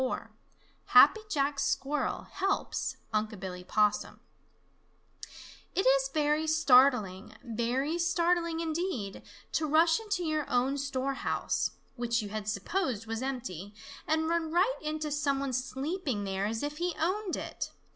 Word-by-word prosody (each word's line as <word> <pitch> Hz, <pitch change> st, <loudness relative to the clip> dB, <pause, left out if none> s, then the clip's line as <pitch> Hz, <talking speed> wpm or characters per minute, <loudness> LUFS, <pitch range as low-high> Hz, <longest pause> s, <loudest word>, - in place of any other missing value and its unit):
XXIV 260 Hz, -, -2 dB, 0.6 s
HAPPY 435 Hz, -, +7 dB
JACK 285 Hz, -4 st, 0 dB
SQUIRREL 290 Hz, +2 st, -1 dB
HELPS 390 Hz, 0 st, -1 dB, 0.2 s
UNC' 215 Hz, -1 st, -1 dB
BILLY 180 Hz, -1 st, -6 dB
POSSUM 210 Hz, +2 st, +1 dB, 1.6 s
It -, -, +3 dB
is 270 Hz, 0 st, +4 dB
very 300 Hz, +1 st, +1 dB
startling, 250 Hz, -, +4 dB
very 250 Hz, +7 st, -1 dB
startling 340 Hz, -1 st, +1 dB
indeed, 315 Hz, -, -3 dB, 0.3 s
to 315 Hz, -, 0 dB
rush 325 Hz, +4 st, +4 dB
into 415 Hz, -5 st, -2 dB
your 310 Hz, -2 st, -1 dB
own 260 Hz, +3 st, +1 dB
storehouse, 275 Hz, -1 st, -1 dB, 0.2 s
which 235 Hz, -1 st, 0 dB
you 205 Hz, -, -6 dB
had 210 Hz, 0 st, -5 dB
supposed 230 Hz, -, -1 dB
was 225 Hz, +1 st, -4 dB
empty, 205 Hz, -8 st, -5 dB, 0.3 s
and 315 Hz, 0 st, +1 dB
run 330 Hz, -1 st, 0 dB
right 370 Hz, +9 st, +3 dB
into 305 Hz, 0 st, -3 dB
some 285 Hz, -2 st, +1 dB
one 275 Hz, -1 st, -2 dB
sleeping 265 Hz, -, -2 dB
there 195 Hz, 0 st, -1 dB
as 225 Hz, +3 st, -3 dB
if 295 Hz, +1 st, -3 dB
he 350 Hz, 0 st, -1 dB
owned 375 Hz, +3 st, 0 dB
it. -, -, -5 dB
275 Hz, 135 wpm, -30 LUFS, 230-325 Hz, 1.6 s, HAPPY